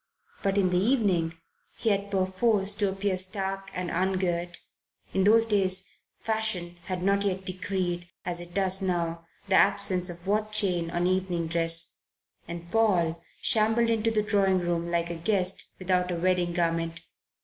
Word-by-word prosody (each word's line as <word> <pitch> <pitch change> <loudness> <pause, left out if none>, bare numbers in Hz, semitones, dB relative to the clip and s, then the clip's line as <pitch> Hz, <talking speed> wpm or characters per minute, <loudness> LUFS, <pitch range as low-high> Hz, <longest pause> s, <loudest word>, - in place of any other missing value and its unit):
But 195 0 0
in 185 -2 +3
the 180 - +3
evening 190 -8 +1 0.4
he 225 - 0
had 200 0 -1
perforce 195 +2 +1
to 200 -1 0
appear 195 -1 -1
stark 195 0 -2
and 180 -2 -3
ungirt 175 -1 -1 0.6
in 190 0 +2
those 225 +2 +6
days 195 -3 0 0.2
Fashion 220 -6 -1
had 185 -1 -3
not 200 +1 +2
yet 190 -1 -1
decreed, 185 -2 -2 0.2
as 175 -1 -2
it 175 0 -10
does 190 -1 +2
now, 170 -3 -2 0.2
the 195 - 0
absence 195 -2 +3
of 175 +1 -9
watchchain 200 -4 +1
on 175 +1 0
evening 185 -2 0
dress 165 0 0 0.5
and 170 0 -7
Paul 175 -7 +2 0.2
shambled 225 +1 +3
into 225 0 +1
the 215 -2 +1
drawing 200 -2 +2
room 170 -1 -1
like 170 0 0
a - - -3
guest 185 +2 0
without 180 -1 0
a 175 - -1
wedding 175 0 +1
garment. 165 -1 -1
185 Hz, 155 wpm, -27 LUFS, 175-200 Hz, 0.6 s, those